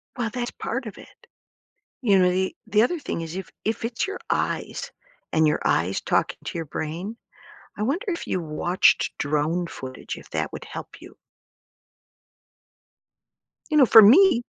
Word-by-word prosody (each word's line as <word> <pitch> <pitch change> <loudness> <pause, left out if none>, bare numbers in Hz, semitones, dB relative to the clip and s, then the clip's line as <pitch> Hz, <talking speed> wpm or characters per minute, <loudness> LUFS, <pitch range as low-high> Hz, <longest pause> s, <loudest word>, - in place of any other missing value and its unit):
Well, 240 -2 -1
that's 240 +1 -3
part 240 +3 -4
of 215 - -8
it. - - -17 0.8
You 205 -6 +4
know, 180 -1 +4
the 190 +1 -1
the 215 0 +3
other 320 +9 +1
thing 285 - -4
is 165 +1 -6
if 190 -2 -6
if 220 +2 -1
it's 230 +8 -2
your 395 - -5
eyes - - -2 0.4
and 160 0 +4
your 150 - +2
eyes 90 +4 +1
talking - - 0
to - - -4
your 165 - -3
brain, 170 +9 -5 0.6
I - - -4
wonder 310 - -1
if 340 -3 -3
you 185 - -1
watched 170 +3 +2
drone 155 +4 0
footage, 130 -4 -7
if - - -13
that - - -2
would - - -7
help - - -9
you. - - -14 2.6
You 305 - +1
know, 275 -4 +7
for 225 0 +9
me, 250 - +7
195 Hz, 165 wpm, -24 LUFS, 165-240 Hz, 2.6 s, for